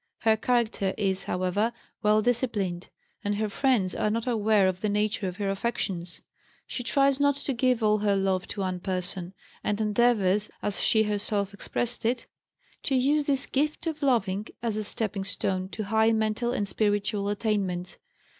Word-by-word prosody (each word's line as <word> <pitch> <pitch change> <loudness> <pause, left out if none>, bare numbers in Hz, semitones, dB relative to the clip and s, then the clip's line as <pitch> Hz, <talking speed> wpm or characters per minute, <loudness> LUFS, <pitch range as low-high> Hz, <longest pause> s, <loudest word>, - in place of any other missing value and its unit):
Her 220 0 +4
character 220 -4 0
is, 195 -2 0
however, 185 +5 0 0.3
well 215 0 +3
disciplined, 210 -7 -1 0.3
and 205 0 0
her 215 +1 -1
friends 215 -5 +1
are 215 - 0
not 225 +1 -1
aware 215 -4 +3
of 185 0 -2
the 215 - 0
nature 210 -1 0
of 180 0 -5
her 205 -2 -2
affections. 195 -4 -2 0.4
She - - -4
tries 275 +2 +2
not 285 -1 +3
to 280 0 -2
give 250 -1 +1
all 215 0 +3
her 205 -1 +2
love 190 -1 0
to 200 - -5
one 185 -1 -2
person, 185 0 -3 0.3
and 210 0 -1
endeavors 210 -2 +2
(as 205 - -1
she 220 -1 +4
herself 205 -1 -1
expresses 240 +5 -2
it) 240 +3 0 0.6
to 270 - 0
use 285 +3 +2
this 275 -2 +4
"gift 300 +4 -1
of 315 -2 -3
loving" 215 -7 +1 0.2
as 225 -3 -1
a 215 - -2
stepping 205 -1 -1
stone 190 -1 -2
to 215 - -4
high 220 +2 +3
mental 220 +2 0
and 205 -5 -1
spiritual 205 0 0
attainments. 200 -4 -2
210 Hz, 170 wpm, -27 LUFS, 195-235 Hz, 0.6 s, Her